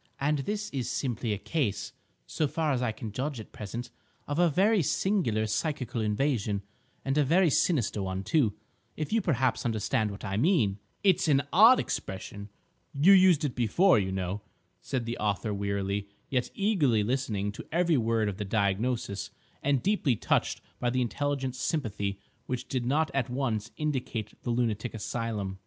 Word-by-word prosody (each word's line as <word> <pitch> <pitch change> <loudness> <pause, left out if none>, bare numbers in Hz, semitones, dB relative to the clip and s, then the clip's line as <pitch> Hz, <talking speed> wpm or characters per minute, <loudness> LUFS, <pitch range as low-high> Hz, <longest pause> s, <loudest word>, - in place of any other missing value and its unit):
"—and 145 +1 +1
this 210 +7 -3
is 130 -4 -2
simply 120 -4 -2
a 105 - 0
case, 115 -2 -2 0.3
so 145 - -1
far 155 +1 0
as 130 -2 0
I 120 -3 +1
can 110 0 -7
judge 135 +3 -3
at 110 - -10
present, 115 +4 -6 0.4
of 145 +3 -2
a 175 -1 +5
very 195 +6 +3
singular 155 - +1
psychical 125 0 -2
invasion, 105 -2 0 0.4
and 135 +2 +1
a - - +5
very 170 +4 +4
sinister 125 - +1
one, 95 0 -3
too, 120 - +2 0.4
if 155 +6 -3
you 225 - +3
perhaps 130 - +1
understand 110 -2 0
what 100 +1 -7
I 95 -1 -2
mean—" 115 - +2 0.2
"It's 190 -5 +4
an 140 -2 +4
odd 230 +6 +8
expression; 100 +2 -5 0.5
you 160 +8 +7
used 185 -5 +6
it 135 - -2
before, 125 - +4
you 95 -1 -1
know," 95 +2 -3 0.4
said 130 -4 -2
the 120 +1 -4
author 105 +1 -1
wearily, 100 0 -2 0.2
yet 125 -2 0
eagerly 155 - +2
listening 105 -4 -1
to 100 - -10
every 170 0 +3
word 115 -1 +1
of 100 -2 -3
the 105 - -3
diagnosis, 100 +1 -1 0.3
and 140 -2 +1
deeply 190 - +2
touched - - 0 0.2
by 120 - +1
the 125 +1 +1
intelligent 135 +1 -2
sympathy 105 - -2 0.3
which 125 0 -3
did 125 -2 -2
not 150 +2 +1
at 135 -3 0
once 120 -4 -1
indicate 130 -7 -2
the - - -5
lunatic 115 -1 -1
asylum. 105 -3 -3
125 Hz, 170 wpm, -29 LUFS, 105-150 Hz, 0.5 s, odd